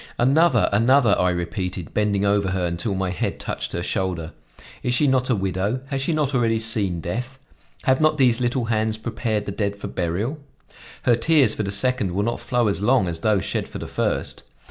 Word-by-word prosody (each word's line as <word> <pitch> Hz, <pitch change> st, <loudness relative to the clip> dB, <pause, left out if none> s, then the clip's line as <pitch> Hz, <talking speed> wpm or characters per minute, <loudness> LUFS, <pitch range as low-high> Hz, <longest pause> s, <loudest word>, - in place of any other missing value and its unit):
"Another, 135 Hz, 0 st, +4 dB
another!" 115 Hz, +2 st, +4 dB
I 90 Hz, -, +3 dB
repeated, 90 Hz, 0 st, -4 dB
bending 105 Hz, -1 st, +1 dB
over 100 Hz, -1 st, +2 dB
her 95 Hz, -1 st, -1 dB
until 85 Hz, +4 st, -2 dB
my 95 Hz, -1 st, -1 dB
head 90 Hz, -, -3 dB
touched -, -, -4 dB
her 85 Hz, -, -2 dB
shoulder. 90 Hz, -4 st, -2 dB, 0.5 s
"Is 125 Hz, 0 st, 0 dB
she 150 Hz, -, +3 dB
not 130 Hz, -2 st, +2 dB
a 125 Hz, -, +3 dB
widow? 95 Hz, +5 st, -1 dB
Has 135 Hz, -1 st, -2 dB
she 135 Hz, -, 0 dB
not 150 Hz, -3 st, 0 dB
already 115 Hz, -3 st, +2 dB
seen 105 Hz, -6 st, 0 dB
death? 125 Hz, +10 st, -4 dB, 0.5 s
Have 130 Hz, +2 st, +2 dB
not 155 Hz, 0 st, +3 dB
these 125 Hz, -3 st, +3 dB
little 120 Hz, 0 st, 0 dB
hands 110 Hz, -1 st, 0 dB
prepared 110 Hz, -2 st, -2 dB
the 100 Hz, -, -4 dB
dead 100 Hz, 0 st, -2 dB
for 100 Hz, -, -9 dB
burial? 95 Hz, -, -2 dB, 0.6 s
Her 120 Hz, -, +4 dB
tears 135 Hz, -2 st, +3 dB
for -, -, -3 dB
the 100 Hz, -, -2 dB
second 105 Hz, -1 st, +1 dB
will 100 Hz, +3 st, 0 dB
not 120 Hz, +2 st, -2 dB
flow 120 Hz, -2 st, 0 dB
as 100 Hz, -1 st, -1 dB
long 120 Hz, -2 st, +3 dB
as 85 Hz, -1 st, -4 dB
those 105 Hz, -2 st, +1 dB
shed -, -, -2 dB
for -, -, -8 dB
the -, -, -6 dB
first. -, -, -2 dB
110 Hz, 205 wpm, -23 LUFS, 95-125 Hz, 0.6 s, Another